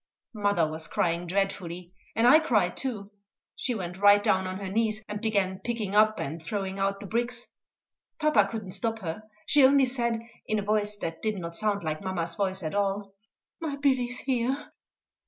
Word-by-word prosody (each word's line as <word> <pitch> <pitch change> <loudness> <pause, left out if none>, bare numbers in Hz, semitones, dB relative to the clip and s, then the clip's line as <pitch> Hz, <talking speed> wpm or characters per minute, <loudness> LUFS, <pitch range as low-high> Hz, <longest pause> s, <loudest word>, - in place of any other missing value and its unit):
Mother 205 -6 +2
was 160 +1 -4
crying 170 0 0
dreadfully, 180 -2 -2 0.2
and 225 - +3
I 295 +6 +8
cried 210 - +1
too. 215 -7 -3 0.4
She 250 - -1
went 180 -2 -5
right 205 0 +6
down 190 -1 +2
on 185 0 -4
her 195 0 -5
knees, 215 +2 0
and 210 0 -5
began 200 -4 0
picking 225 -5 -3
up 215 +1 +4
and 155 +4 -4
throwing 195 +3 -3
out 195 0 0
the - - -7
bricks. 240 +3 -2 0.7
Papa 305 -11 +4
could 225 0 -4
not 185 -2 -7
stop 225 +3 -1
her; 170 +3 -4 0.2
she 290 -2 +5
only 270 0 +6
said, 235 -3 -1 0.2
in 215 - +1
a 205 - -1
voice 210 0 0
that 165 0 -4
did 215 -2 -1
not 170 -2 -5
sound 205 -1 0
like 155 -1 -2
mamma's 175 -3 -2
voice 190 0 -2
at 155 - -3
all, 200 0 -1 0.5
"My 315 -4 -3
Billy's 260 -3 +1
here." 260 +1 -1
205 Hz, 185 wpm, -28 LUFS, 185-230 Hz, 0.7 s, I